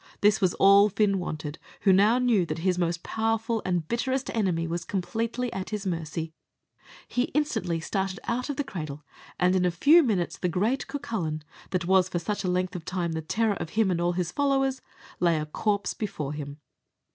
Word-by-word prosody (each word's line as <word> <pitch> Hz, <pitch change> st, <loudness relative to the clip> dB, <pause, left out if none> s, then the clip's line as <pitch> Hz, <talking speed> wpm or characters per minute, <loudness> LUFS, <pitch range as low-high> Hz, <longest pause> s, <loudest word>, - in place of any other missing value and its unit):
This 210 Hz, +1 st, +4 dB
was 185 Hz, -2 st, +2 dB
all 200 Hz, +1 st, +6 dB
Fin 200 Hz, -1 st, +2 dB
wanted, 155 Hz, -3 st, -5 dB, 0.2 s
who 195 Hz, -, +5 dB
now 210 Hz, +5 st, +5 dB
knew 240 Hz, -7 st, +3 dB
that -, -, -3 dB
his 180 Hz, -1 st, +2 dB
most 170 Hz, 0 st, -1 dB
powerful 225 Hz, 0 st, -1 dB
and 175 Hz, -4 st, -1 dB
bitterest 260 Hz, +4 st, -1 dB
enemy 180 Hz, -7 st, +1 dB
was 170 Hz, +1 st, -3 dB
completely 225 Hz, +7 st, -2 dB
at 190 Hz, 0 st, -4 dB
his 210 Hz, -2 st, -4 dB
mercy. 165 Hz, -2 st, -3 dB, 0.7 s
He 245 Hz, +1 st, 0 dB
instantly 185 Hz, -, 0 dB
started 190 Hz, +3 st, -2 dB
out 250 Hz, +4 st, -2 dB
of 285 Hz, -, -2 dB
the 290 Hz, -, -1 dB
cradle, 155 Hz, -, -6 dB, 0.4 s
and 180 Hz, +1 st, +3 dB
in 185 Hz, -, +2 dB
a 180 Hz, -, +3 dB
few 285 Hz, -, +6 dB
minutes 205 Hz, -, -1 dB
the 180 Hz, -, 0 dB
great 210 Hz, +10 st, 0 dB
Cucullin, 170 Hz, -, -3 dB, 0.3 s
that 180 Hz, -2 st, -1 dB
was 185 Hz, 0 st, +4 dB
for 180 Hz, -, -2 dB
such 205 Hz, +5 st, -2 dB
a 185 Hz, -, 0 dB
length 180 Hz, 0 st, 0 dB
of 175 Hz, -, -5 dB
time 175 Hz, -1 st, -2 dB
the 160 Hz, 0 st, -2 dB
terror 220 Hz, +7 st, +1 dB
of 170 Hz, -3 st, -5 dB
him 215 Hz, -4 st, +4 dB
and 170 Hz, -1 st, 0 dB
all 175 Hz, 0 st, +1 dB
his 175 Hz, -1 st, -2 dB
followers, 270 Hz, 0 st, +1 dB, 0.4 s
lay 170 Hz, -2 st, +3 dB
a 155 Hz, -, -2 dB
corpse 200 Hz, +5 st, -1 dB
before 150 Hz, -9 st, -4 dB
him. 145 Hz, -1 st, -6 dB
185 Hz, 195 wpm, -27 LUFS, 170-225 Hz, 0.7 s, all